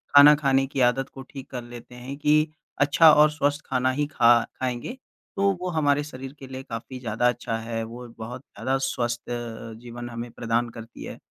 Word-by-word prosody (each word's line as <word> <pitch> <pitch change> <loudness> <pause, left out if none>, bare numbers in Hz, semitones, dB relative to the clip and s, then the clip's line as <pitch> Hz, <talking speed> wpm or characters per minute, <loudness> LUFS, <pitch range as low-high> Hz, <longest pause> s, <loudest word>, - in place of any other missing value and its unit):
खाना 145 +1 +10
खाने 135 -2 +2
की 135 - -4
आदत 135 +2 -1
को 135 - -10
ठीक 135 -2 -9
कर 125 -2 -4
लेते 120 +1 -11
हैं, 130 +3 -7
कि 150 +1 +3 0.3
अच्छा 150 +2 +7
और 150 0 +6
स्वस्थ 145 0 0
खाना 130 0 +1
ही 145 +2 -1
खा 120 -5 +5 0.3
खाएँगे 130 - -3 0.4
तो 200 0 +3
वो 180 - -2
हमारे 145 -3 +2
शरीर 135 -2 -8
के 135 - -9
लिए 130 0 -7
काफ़ी 125 +3 -7
ज़्यादा 120 0 0
अच्छा 115 -2 -2
है, 115 0 -4
वो 120 +2 -8
बहुत 120 +3 -7
ज़्यादा 135 -1 -2
स्वस्थ 120 -2 -2
अ, 115 -1 -5
जीवन 120 0 -8
हमें 120 +1 -6
प्रदान 115 +1 -1
करती 115 0 -10
है। - - -7
130 Hz, 195 wpm, -25 LUFS, 120-145 Hz, 0.4 s, खाना